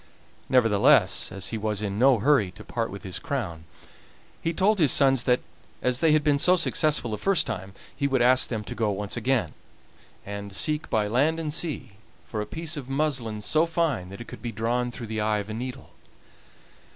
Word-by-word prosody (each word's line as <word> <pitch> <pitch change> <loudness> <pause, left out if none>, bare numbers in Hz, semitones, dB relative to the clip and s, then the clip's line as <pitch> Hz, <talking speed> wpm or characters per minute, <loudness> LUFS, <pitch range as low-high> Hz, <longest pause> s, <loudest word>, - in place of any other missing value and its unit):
Nevertheless, 115 -6 +4
as 95 -1 -4
he 110 - -3
was 105 -1 -2
in 100 0 -3
no 130 0 +5
hurry 115 -3 +3
to 105 +2 -11
part 115 0 -3
with 100 -1 -9
his 95 -1 -3
crown, 85 - -4 0.8
he 165 - 0
told 195 +5 +2
his 150 -6 +4
sons 135 -3 +3
that, 125 0 +3 0.4
as 125 0 +1
they 160 0 +4
had 155 0 +3
been 145 -1 +2
so 180 +5 +5
successful 155 -7 +1
the 105 - -3
first 195 -3 +3
time, 95 -4 -5 0.2
he 140 0 0
would 130 -3 +2
ask 130 +1 +4
them 110 -3 -3
to - - -6
go 110 -2 0
once 100 0 -3
again, 120 - 0 0.7
and 100 0 -6
seek 150 +8 0
by 110 -1 +1
land 145 +9 +1
and 155 -2 -3
sea 140 -10 -3 0.3
for 110 - -3
a 105 - -5
piece 160 0 -4
of 135 -3 -7
muslin 130 -7 -1
so 155 +9 +2
fine 160 - -1
that 100 - -9
it 120 - -9
could - - -10
be 120 - -4
drawn 120 +3 -1
through 120 0 -7
the 110 0 -3
eye 105 0 +1
of 105 0 -5
a - - -4
needle. 130 +3 -6
120 Hz, 205 wpm, -26 LUFS, 105-145 Hz, 0.8 s, no